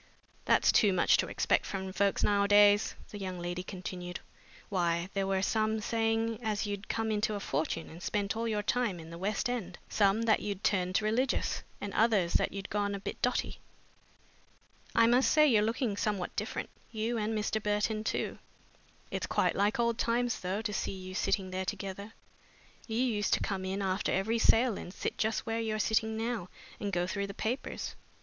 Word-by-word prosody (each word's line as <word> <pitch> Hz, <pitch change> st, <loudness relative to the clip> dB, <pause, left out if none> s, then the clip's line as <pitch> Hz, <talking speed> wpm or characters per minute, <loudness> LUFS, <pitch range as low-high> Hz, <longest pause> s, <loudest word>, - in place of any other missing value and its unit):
"That's -, -, +4 dB
too 205 Hz, -4 st, +4 dB
much 180 Hz, -, +4 dB
to -, -, 0 dB
expect -, -, +1 dB
from 190 Hz, -1 st, -4 dB
folks 200 Hz, 0 st, +1 dB
nowadays," 205 Hz, 0 st, +5 dB, 0.2 s
the 205 Hz, -, -7 dB
young 185 Hz, -2 st, -4 dB
lady 175 Hz, +1 st, -3 dB
continued. 180 Hz, -1 st, -6 dB, 0.5 s
"Why, 175 Hz, -2 st, 0 dB
there 195 Hz, -1 st, 0 dB
were 190 Hz, 0 st, +1 dB
some 220 Hz, +1 st, +1 dB
saying 225 Hz, 0 st, 0 dB
as 215 Hz, -2 st, -1 dB
you'd 205 Hz, 0 st, -4 dB
come 225 Hz, -1 st, 0 dB
into 215 Hz, 0 st, 0 dB
a -, -, -3 dB
fortune 160 Hz, -1 st, -2 dB
and 165 Hz, +2 st, -11 dB
spent 200 Hz, +1 st, -1 dB
all 230 Hz, +1 st, -1 dB
your 210 Hz, -2 st, -1 dB
time 220 Hz, -5 st, 0 dB
in 165 Hz, 0 st, -10 dB
the 170 Hz, -, -8 dB
west 200 Hz, +4 st, -1 dB
end, 215 Hz, -8 st, -3 dB
some 205 Hz, +2 st, +3 dB
that 225 Hz, -1 st, +4 dB
you'd 200 Hz, -1 st, -4 dB
turned 185 Hz, +1 st, +1 dB
religious, 240 Hz, +5 st, 0 dB, 0.2 s
and 205 Hz, -1 st, -5 dB
others 210 Hz, -6 st, +3 dB
that -, -, +2 dB
you'd 195 Hz, -1 st, -6 dB
gone 205 Hz, -1 st, 0 dB
a -, -, -5 dB
bit -, -, -6 dB
dotty. 250 Hz, -, 0 dB, 1.4 s
I 230 Hz, -, +6 dB
must 245 Hz, +3 st, +4 dB
say 305 Hz, 0 st, +6 dB
you're 225 Hz, -6 st, +5 dB
looking 225 Hz, 0 st, 0 dB
somehow 200 Hz, -3 st, -1 dB
different, -, -, -3 dB, 0.2 s
you 225 Hz, +1 st, -1 dB
and 215 Hz, +1 st, -1 dB
Mr. 215 Hz, +1 st, -1 dB
Burton 210 Hz, +1 st, 0 dB
too. -, -, -2 dB, 0.7 s
It's -, -, -2 dB
quite -, -, +1 dB
like 205 Hz, +3 st, +1 dB
old 235 Hz, -1 st, +1 dB
times, 240 Hz, +1 st, +1 dB
though, 190 Hz, +4 st, -2 dB
to 210 Hz, -1 st, -2 dB
see 195 Hz, -, -2 dB
you 185 Hz, -1 st, -8 dB
sitting 190 Hz, -1 st, 0 dB
there 185 Hz, 0 st, -2 dB
together. 200 Hz, +2 st, -5 dB, 0.7 s
You 225 Hz, -1 st, -2 dB
used 230 Hz, -5 st, +1 dB
to -, -, -3 dB
come 195 Hz, -2 st, -2 dB
in 195 Hz, +1 st, -2 dB
after 190 Hz, +1 st, 0 dB
every 220 Hz, +4 st, +1 dB
sale 225 Hz, 0 st, +4 dB
and 175 Hz, -, -8 dB
sit -, -, -4 dB
just 220 Hz, 0 st, 0 dB
where 225 Hz, 0 st, -1 dB
you're 220 Hz, -1 st, -1 dB
sitting 220 Hz, 0 st, +1 dB
now 225 Hz, -5 st, -2 dB, 0.3 s
and 205 Hz, -, -2 dB
go 175 Hz, -1 st, +1 dB
through 200 Hz, +2 st, -2 dB
the 200 Hz, -, -8 dB
papers. 240 Hz, +5 st, -3 dB
205 Hz, 190 wpm, -31 LUFS, 190-225 Hz, 1.4 s, I